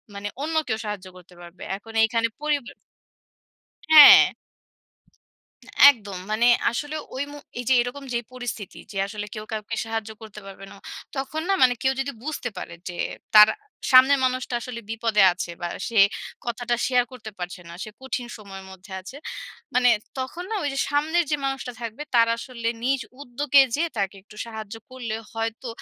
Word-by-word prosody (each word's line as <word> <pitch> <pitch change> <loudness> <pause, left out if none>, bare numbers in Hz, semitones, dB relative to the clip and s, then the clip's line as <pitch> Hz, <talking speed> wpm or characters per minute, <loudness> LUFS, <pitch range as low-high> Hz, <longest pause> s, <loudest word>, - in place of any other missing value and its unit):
মানে 200 +1 -5 0.2
অন্য 320 +1 -3
কেউ 220 -2 -1
সাহায্য 205 -3 -5
করতে 180 0 -17
পারবে। 175 0 -12
এখন 225 +2 -14
এখানে 230 0 0
পরিবার" 295 -5 -1 1.2
হ্যাঁ। 305 -2 +10 1.6
একদম। 205 -7 -6
মানে 225 +3 +2 0.2
আসলে 290 +6 -4 0.2
ওই 260 - -2
মো 290 - -9 0.2
এইযে 245 +1 0
এরকম 245 +4 -4
যে - - +2
পরিস্থিতি 245 -6 -6
যে - - -11
আসলে 205 0 -6
কেউ 215 - -6
কাউকে 220 +1 -4
সাহায্য 225 -1 -4
করতে 215 -1 -10
পারবে 195 0 -10
না। - - -13 0.4
তখন 275 +4 -3
না 390 - +3
মানে 250 -1 +6
কেউ 265 0 +3
যদি 275 +1 -2
বুঝতে 300 -5 -3
পারে 170 - -7
যে 175 - -7 0.4
তার 210 0 +10
আ - - -20 0.4
সামনের 265 +2 +7
মানুষটা 255 -1 -1
আসলে 235 -1 -6
বিপদে 225 -2 +2
আছে 180 -1 -5
বা, 175 - -2 0.2
সে 230 - -6 0.5
কথাটা 240 0 -1
শেয়ার 250 -1 +3
করতে 220 -3 -9
পারছে 180 0 -6
না। - - -10
সে 215 - -9
কঠিন 265 -2 -4
সময়ের 195 -2 -10
মধ্যে 190 +1 -13
আছে। 195 +9 -11 0.6
মানে 250 0 +4 0.3
তখন 290 +7 -4
না - - -2
ওইযে 275 -2 -2
সামনের 315 +4 +1
যে 295 - +2
মানুষটা 270 -2 -3
থাকবে 230 +5 -6
তারা 230 -1 +5
আসলে 235 -2 -4
নিজ 265 +2 +1 0.2
উদ্যোগে 285 +2 +3
যেয়ে 330 +2 0
তাকে 195 0 -1
একটু 210 +1 -17
সাহায্য 220 -1 -7 0.2
করলে 240 -4 -5 0.2
হয়তো, 225 +2 -4
235 Hz, 165 wpm, -24 LUFS, 210-265 Hz, 1.6 s, হ্যাঁ